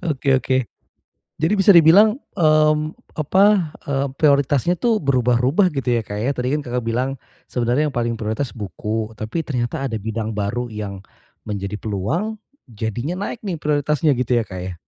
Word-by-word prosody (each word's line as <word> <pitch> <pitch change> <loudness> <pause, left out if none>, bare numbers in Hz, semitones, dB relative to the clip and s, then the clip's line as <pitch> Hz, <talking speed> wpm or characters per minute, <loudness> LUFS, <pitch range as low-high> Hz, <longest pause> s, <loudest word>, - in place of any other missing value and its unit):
Oke 140 -1 -3
oke. 130 0 0 0.8
Jadi 165 +6 +2
bisa 195 +1 +6
dibilang, 195 - +6 0.2
eee, 155 -2 +4 0.4
apa, 185 +2 +3 0.2
eee, 140 0 0
prioritasnya 145 +3 +3
tuh 225 +2 +1
berubah-rubah 130 - +2
gitu 135 -4 -3
ya, 115 - -1
Kak, 105 0 -5
ya, 125 +5 0
tadi 125 +2 -1
kan 150 - 0
Kakak 125 -3 -3
bilang 125 +4 -1 0.3
sebenarnya 125 +5 +1
yang 135 - -9
paling 120 -1 0
prioritas 110 +5 -2
buku, 110 +1 -4
tapi 110 +10 -3
ternyata 125 -4 -2
ada 115 - -3
bidang 110 +1 -4
baru 120 +4 -2
yang 105 -3 -6 0.5
menjadi 100 0 -4
peluang 135 - -2 0.3
jadinya 120 - -4
naik - - -6
nih 190 -5 -3
prioritasnya 150 0 +1
gitu 125 -1 0
ya, 115 - +1
Kak, 95 -3 -8
ya? 90 +1 -5
130 Hz, 160 wpm, -21 LUFS, 110-155 Hz, 0.8 s, bisa